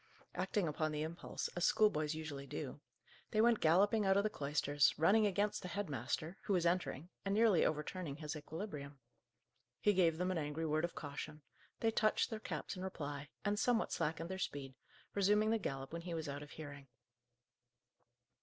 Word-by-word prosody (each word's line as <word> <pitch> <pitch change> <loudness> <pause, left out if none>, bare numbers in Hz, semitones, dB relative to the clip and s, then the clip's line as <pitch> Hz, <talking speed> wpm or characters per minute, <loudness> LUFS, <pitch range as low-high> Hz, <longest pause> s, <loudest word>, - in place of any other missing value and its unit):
Acting 205 -7 0
upon 155 +1 0
the 150 0 -1
impulse, 165 +2 -4
as 175 - -3
schoolboys 155 -9 +3
usually 145 -3 -5
do, - - -5 0.5
they 215 - 0
went 230 0 +5
galloping 200 +7 +4
out 195 0 +4
of 200 - +4
the 215 - 0
cloisters, 145 -1 +2
running 210 +7 +5
against 205 +2 0
the - - -5
head 200 -2 -3
master, 160 +5 -2
who 205 - +1
was 175 -2 +2
entering, 170 -2 0
and 195 0 0
nearly 220 -5 +5
overturning 155 0 -1
his 150 0 -5
equilibrium. 150 -2 -6 0.8
He 210 - +4
gave 170 -4 +3
them 180 +2 0
an 180 - 0
angry 150 +2 -2
word 155 +1 +2
of 170 - -7
caution; 150 +1 -6 0.4
they 225 - +3
touched 220 +2 +2
their 220 - -3
caps - - -4
in 185 - -6
reply, 145 -6 -5 0.2
and 205 0 +1
somewhat 240 -2 +2
slackened 165 +3 -1
their 190 - -4
speed, 140 -6 -3 0.4
resuming 210 +2 +3
the 225 - +2
gallop 135 -6 -4
when 170 - -3
he 170 -1 -4
was 160 -1 -3
out 140 0 -4
of 145 - -9
hearing. 145 -3 -9
165 Hz, 180 wpm, -37 LUFS, 150-205 Hz, 0.8 s, went